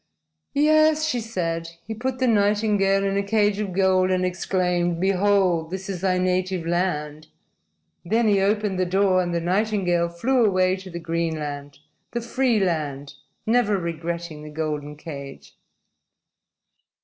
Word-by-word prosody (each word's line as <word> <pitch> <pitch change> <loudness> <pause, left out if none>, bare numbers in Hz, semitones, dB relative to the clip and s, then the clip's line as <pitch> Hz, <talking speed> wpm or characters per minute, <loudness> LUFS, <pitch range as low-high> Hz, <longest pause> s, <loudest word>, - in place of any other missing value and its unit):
"Yes," 310 +1 +4
she 250 -5 0
said. 165 -7 -3 0.2
"He 220 - -5
put 255 +3 -3
the 260 - +1
nightingale 205 -2 +2
in 195 0 0
a - - +2
cage 205 0 +1
of 205 -3 -2
gold 185 0 +2
and 185 0 +1
exclaimed: 180 -1 0
'Behold, 190 -3 +2
this 190 +2 -6
is 185 -3 -4
thy 185 -1 +1
native 185 -1 0
land!' 155 -3 -2 0.8
Then 225 +5 +1
he 200 -2 +3
opened 205 -1 0
the 185 - +2
door 190 0 +3
and 175 -1 -2
the 170 - 0
nightingale 180 -1 0
flew 240 +9 +1
away 185 -3 +3
to 190 0 -10
the 170 - -6
green 165 -1 -2
land, 145 -1 -6 0.4
the 240 - -1
free 240 -1 +1
land, 150 -6 -2 0.3
never 220 -3 +2
regretting 170 -2 -4
the 150 - -9
golden 150 -1 -4
cage." 140 -3 -9
185 Hz, 150 wpm, -23 LUFS, 170-205 Hz, 0.8 s, Yes